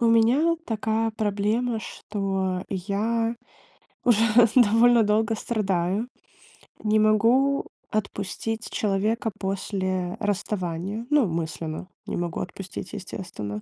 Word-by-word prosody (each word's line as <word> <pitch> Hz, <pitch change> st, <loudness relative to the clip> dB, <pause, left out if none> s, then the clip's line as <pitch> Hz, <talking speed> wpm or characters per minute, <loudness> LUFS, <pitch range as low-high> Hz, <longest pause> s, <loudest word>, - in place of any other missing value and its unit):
У 235 Hz, -, +3 dB
меня 240 Hz, +9 st, +4 dB
такая 225 Hz, 0 st, 0 dB
проблема, 215 Hz, +3 st, 0 dB
что 195 Hz, -4 st, -2 dB
я 220 Hz, +5 st, -1 dB, 0.7 s
уже 230 Hz, -3 st, +4 dB, 0.3 s
довольно 235 Hz, 0 st, +6 dB
долго 215 Hz, +1 st, +2 dB
страдаю, 200 Hz, -1 st, -1 dB, 0.7 s
не 215 Hz, 0 st, +2 dB
могу 230 Hz, +6 st, +3 dB, 0.2 s
отпустить 215 Hz, +2 st, -3 dB
человека 215 Hz, +2 st, 0 dB
после 185 Hz, -2 st, -2 dB
расставания. 200 Hz, 0 st, -2 dB
Ну, 295 Hz, -6 st, +4 dB
мысленно 165 Hz, 0 st, -4 dB, 0.2 s
не -, -, -3 dB
могу 175 Hz, -1 st, -2 dB
отпустить, 185 Hz, 0 st, -7 dB
естественно. 175 Hz, -, -6 dB
210 Hz, 95 wpm, -25 LUFS, 190-225 Hz, 0.7 s, довольно